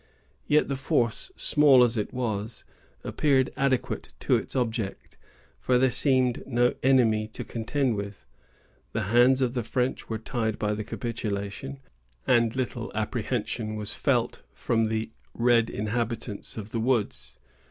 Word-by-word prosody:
Yet 150 Hz, +1 st, +4 dB
the 140 Hz, -, -1 dB
force, 125 Hz, -, 0 dB
small 140 Hz, -4 st, +5 dB
as 120 Hz, -1 st, +2 dB
it 105 Hz, -2 st, -2 dB
was, 110 Hz, -3 st, -3 dB, 0.4 s
appeared 135 Hz, -3 st, +2 dB
adequate 135 Hz, -2 st, -1 dB
to -, -, +3 dB
its -, -, -3 dB
object, 115 Hz, -5 st, -2 dB, 0.4 s
for 125 Hz, -, +2 dB
there 130 Hz, 0 st, +3 dB
seemed 130 Hz, -1 st, +2 dB
no 120 Hz, -1 st, +2 dB
enemy 115 Hz, -5 st, +3 dB
to 110 Hz, -, -7 dB
contend 120 Hz, +2 st, -1 dB
with. 100 Hz, -8 st, -6 dB, 0.7 s
The -, -, -1 dB
hands 130 Hz, +2 st, +5 dB
of 125 Hz, -2 st, +1 dB
the 125 Hz, -, -1 dB
French 125 Hz, +3 st, -2 dB
were 110 Hz, -, -1 dB
tied 110 Hz, -1 st, -2 dB
by 105 Hz, 0 st, 0 dB
the 105 Hz, +1 st, -3 dB
capitulation, 115 Hz, +4 st, -4 dB, 0.4 s
and 115 Hz, -1 st, +3 dB
little 125 Hz, -2 st, -3 dB
apprehension 110 Hz, 0 st, -2 dB
was 105 Hz, -1 st, -3 dB
felt -, -, 0 dB
from 115 Hz, -1 st, +1 dB
the 110 Hz, 0 st, -2 dB, 0.2 s
red 115 Hz, -1 st, +3 dB
inhabitants 115 Hz, 0 st, -3 dB
of 110 Hz, 0 st, -7 dB
the 115 Hz, -, -1 dB
woods. 105 Hz, -, -1 dB
115 Hz, 140 wpm, -27 LUFS, 110-130 Hz, 0.7 s, small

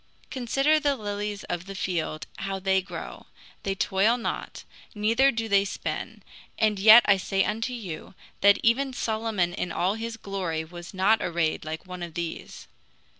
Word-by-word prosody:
Consider 275 Hz, +4 st, +2 dB
the 290 Hz, -2 st, +1 dB
lilies 205 Hz, -2 st, -4 dB
of 175 Hz, +1 st, -4 dB
the 195 Hz, -, -7 dB
field 165 Hz, -4 st, -2 dB
how 195 Hz, -2 st, -3 dB
they 190 Hz, 0 st, +2 dB
grow; 185 Hz, -, -8 dB, 0.3 s
they 195 Hz, -1 st, -2 dB
toil 195 Hz, +5 st, +2 dB
not, 235 Hz, -, -5 dB, 0.3 s
neither 230 Hz, +6 st, +3 dB
do 225 Hz, -3 st, -2 dB
they 200 Hz, -2 st, +4 dB
spin; 200 Hz, -, -5 dB, 0.3 s
and 215 Hz, -2 st, +2 dB
yet 220 Hz, +4 st, +9 dB
I 200 Hz, -1 st, +5 dB
say 195 Hz, +1 st, 0 dB
unto 225 Hz, +4 st, -2 dB
you, 195 Hz, -6 st, -7 dB, 0.2 s
That 200 Hz, 0 st, +6 dB
even 260 Hz, +4 st, +2 dB
Solomon 220 Hz, -7 st, -1 dB
in 180 Hz, -, -3 dB
all 180 Hz, +4 st, +1 dB
his 225 Hz, +1 st, -5 dB
glory 185 Hz, -6 st, -3 dB
was 175 Hz, +1 st, -10 dB
not 200 Hz, +4 st, +3 dB
arrayed 170 Hz, -2 st, -1 dB
like 160 Hz, +3 st, -5 dB
one 180 Hz, -1 st, -8 dB
of 170 Hz, -2 st, -6 dB
these. 170 Hz, -1 st, -6 dB
200 Hz, 165 wpm, -26 LUFS, 180-225 Hz, 0.3 s, yet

